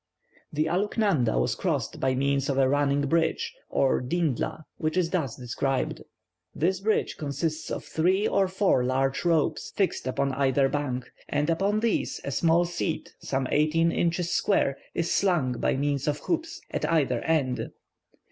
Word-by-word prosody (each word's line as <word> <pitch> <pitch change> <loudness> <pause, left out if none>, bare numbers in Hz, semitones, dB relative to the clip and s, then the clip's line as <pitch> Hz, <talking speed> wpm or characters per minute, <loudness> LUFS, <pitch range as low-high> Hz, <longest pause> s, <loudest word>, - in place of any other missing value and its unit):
The 155 0 0
Aluknanda 180 - +1
was - - +1
crossed - - -2
by 130 -1 +1
means 140 +1 +1
of 135 - 0
a 135 -1 +4
running 145 +1 +2
bridge, 170 - 0 0.2
or 135 - +2
"Dindla," 155 +1 -1 0.2
which 155 +3 -1
is 170 -2 +1
thus 155 - -1
described: 130 +2 -2 0.5
"This 180 +4 +1
bridge 215 +3 0
consists 155 +2 -3
of - - -4
three 185 +6 +1
or 195 - +2
four 185 -8 +2
large 135 +2 0
ropes 165 -3 +1
fixed 195 -8 0
upon 135 +1 0
either 135 0 +2
bank, 130 -3 -3 0.2
and 150 +3 +1
upon 200 +5 +1
these 230 -1 0
a 140 - -3
small 165 +5 +3
seat 170 -1 -3
some 135 -1 -2
eighteen 160 +3 +3
inches 175 +1 0
square 140 -9 +2 0.2
is 170 0 0
slung 155 -11 +1
by - - +1
means 140 0 -1
of 145 -1 +1
hoops 330 -1 -2
at - - -1
either 135 -7 +2
end. 145 -6 0
155 Hz, 155 wpm, -27 LUFS, 135-175 Hz, 0.5 s, a